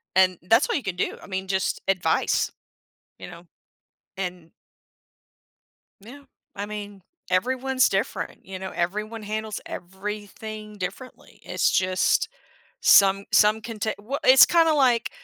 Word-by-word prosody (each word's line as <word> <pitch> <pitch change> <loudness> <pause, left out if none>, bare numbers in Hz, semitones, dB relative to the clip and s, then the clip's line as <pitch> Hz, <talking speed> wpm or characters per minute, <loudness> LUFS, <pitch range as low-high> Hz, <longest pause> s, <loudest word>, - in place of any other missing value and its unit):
and, 185 -1 +4
that's 225 - +3
all - - 0
you 280 - -2
can 190 -4 -3
do, 180 - -2
I - - -12
mean, 190 -1 -4
just 190 0 -1
advice. 195 -2 +1 0.7
You - - -8
know, 170 0 -13 0.7
and 180 -3 -6 1.5
Yeah, 250 +8 -13 0.3
I 205 0 -5
mean, 205 -2 -8 0.3
everyone's 255 +6 +2
different, 195 +1 -3
you 190 0 -7
know, 190 0 -6
everyone 210 +6 -3
handles 215 0 -4
everything 210 +3 -7
differently. 195 +8 -8
It's - - +1
just 185 0 +1 0.5
some 195 0 +5
some 215 +1 +4
can 225 0 -8
ta 220 +2 0
well, 270 +8 -4
it's 260 -2 +8
kinda 330 -2 +4
like, 250 -5 +2
205 Hz, 135 wpm, -24 LUFS, 190-225 Hz, 1.5 s, it's